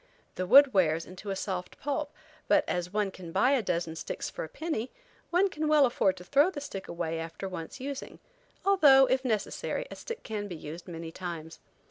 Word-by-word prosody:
The 185 Hz, -, -3 dB
wood 275 Hz, +4 st, +8 dB
wears 165 Hz, -4 st, +2 dB
into 185 Hz, +3 st, -9 dB
a 195 Hz, -, -1 dB
soft 185 Hz, -2 st, -4 dB
pulp, 290 Hz, +1 st, -2 dB, 0.4 s
but 300 Hz, 0 st, +4 dB
as 180 Hz, 0 st, -2 dB
one 205 Hz, -1 st, 0 dB
can 180 Hz, -3 st, -9 dB
buy 195 Hz, +9 st, +3 dB
a 275 Hz, -3 st, +3 dB
dozen 170 Hz, -4 st, -2 dB
sticks -, -, -5 dB
for -, -, -5 dB
a 160 Hz, -, -7 dB
penny 300 Hz, -, -3 dB, 0.4 s
one 360 Hz, +3 st, +4 dB
can 310 Hz, -4 st, -3 dB
well 300 Hz, -2 st, +6 dB
afford 195 Hz, -6 st, +1 dB
to 180 Hz, -, -10 dB
throw 285 Hz, -, +4 dB
the 350 Hz, -6 st, -6 dB
stick 200 Hz, -9 st, -7 dB
away 165 Hz, -1 st, -3 dB
after 165 Hz, +4 st, -5 dB
once 170 Hz, -3 st, -7 dB
using; 275 Hz, +1 st, -6 dB, 0.5 s
although, 290 Hz, -9 st, +7 dB
if 260 Hz, +1 st, +1 dB
necessary, 245 Hz, -, -2 dB
a -, -, -6 dB
stick 465 Hz, 0 st, -7 dB
can 210 Hz, -2 st, -4 dB
be 180 Hz, -, -6 dB
used 160 Hz, +3 st, -8 dB
many 165 Hz, -2 st, -6 dB
times. 165 Hz, -2 st, -7 dB
195 Hz, 200 wpm, -29 LUFS, 175-280 Hz, 0.5 s, wood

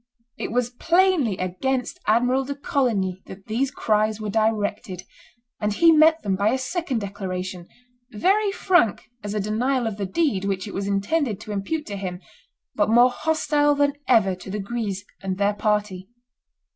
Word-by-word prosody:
It -, -, -5 dB
was 245 Hz, 0 st, 0 dB
plainly 335 Hz, -, +2 dB
against 245 Hz, +8 st, -2 dB
Admiral 245 Hz, +5 st, +3 dB
de 280 Hz, +1 st, -5 dB
Coligny 215 Hz, -10 st, -1 dB
that 190 Hz, +1 st, -11 dB
these 245 Hz, +5 st, 0 dB
cries 215 Hz, -4 st, 0 dB
were 215 Hz, -1 st, -4 dB
directed; 210 Hz, -4 st, -1 dB, 0.6 s
and 210 Hz, -1 st, 0 dB
he 330 Hz, +9 st, +5 dB
met 315 Hz, 0 st, +5 dB
them 195 Hz, -2 st, 0 dB
by 200 Hz, +2 st, +2 dB
a 255 Hz, -, +1 dB
second 265 Hz, -2 st, -2 dB
declaration, 185 Hz, -3 st, -5 dB, 0.4 s
very 395 Hz, -, +2 dB
frank 350 Hz, -, +1 dB
as 205 Hz, 0 st, -4 dB
a -, -, 0 dB
denial 240 Hz, +5 st, 0 dB
of 220 Hz, -3 st, -3 dB
the 200 Hz, -2 st, -3 dB
deed 225 Hz, -, 0 dB
which 195 Hz, 0 st, -2 dB
it 200 Hz, -, -8 dB
was 195 Hz, 0 st, -3 dB
intended 205 Hz, -, 0 dB
to 215 Hz, -, -8 dB
impute 255 Hz, +11 st, -3 dB
to 200 Hz, -2 st, -6 dB
him, 180 Hz, -2 st, -5 dB, 0.5 s
but -, -, +1 dB
more 240 Hz, +3 st, +6 dB
hostile 295 Hz, 0 st, +1 dB
than 285 Hz, 0 st, +2 dB
ever 220 Hz, -6 st, +4 dB
to 185 Hz, +1 st, -10 dB
the 205 Hz, -, -3 dB
Guises 205 Hz, -2 st, -4 dB, 0.2 s
and 190 Hz, -1 st, -3 dB
their 200 Hz, +1 st, +2 dB
party. 205 Hz, -3 st, -1 dB
215 Hz, 170 wpm, -23 LUFS, 195-270 Hz, 0.6 s, more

